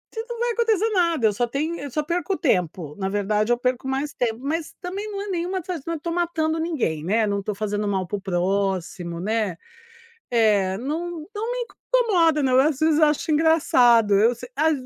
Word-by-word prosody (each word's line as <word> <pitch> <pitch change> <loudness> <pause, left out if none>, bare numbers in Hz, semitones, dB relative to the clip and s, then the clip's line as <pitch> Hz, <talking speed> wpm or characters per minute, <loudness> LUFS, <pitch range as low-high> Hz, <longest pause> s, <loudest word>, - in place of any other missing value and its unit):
Pe - - -4
se - - -10
não 475 -1 -5
vai 480 0 +1
acontecer 450 -2 +1
nada, 335 - +2
eu 210 - +1
só 240 +4 0
tenho 310 +7 -2
eu 285 - -6
só 300 +4 -2
perco 350 +4 -1
tempo, 175 - -1
na 190 -1 -2
verdade 210 +2 0
eu 240 - +3
perco 250 +1 -1
mais 270 +2 -2
tempo, 230 -2 -1
mas 315 +3 -2
também 395 +4 -5
não 400 - -4
é - - -7
nenhuma 365 +1 -2 0.3
não 335 0 -2
tô 335 +3 -4
matando 330 -2 0
ninguém, 265 - -1
né, 215 +6 +2
não 200 -1 -1
tô 205 +1 -4
fazendo 210 0 -2
mal 190 -2 0
para 205 - -3
o - - -10
próximo, 185 -2 -1
né. 210 -2 -1 0.7
É, 210 -5 +3
não 320 +4 -4
não 450 +3 -2
me - - -2 0.4
incomoda 335 -9 +3
não, 260 -1 +4
às 285 0 +2
vezes 315 0 +3
eu 310 - +6
acho 300 +1 0
engraçado. 250 -9 +4
Eu 220 +5 +4
se 245 +1 -10
a 315 +3 +3
265 Hz, 205 wpm, -23 LUFS, 205-335 Hz, 0.7 s, eu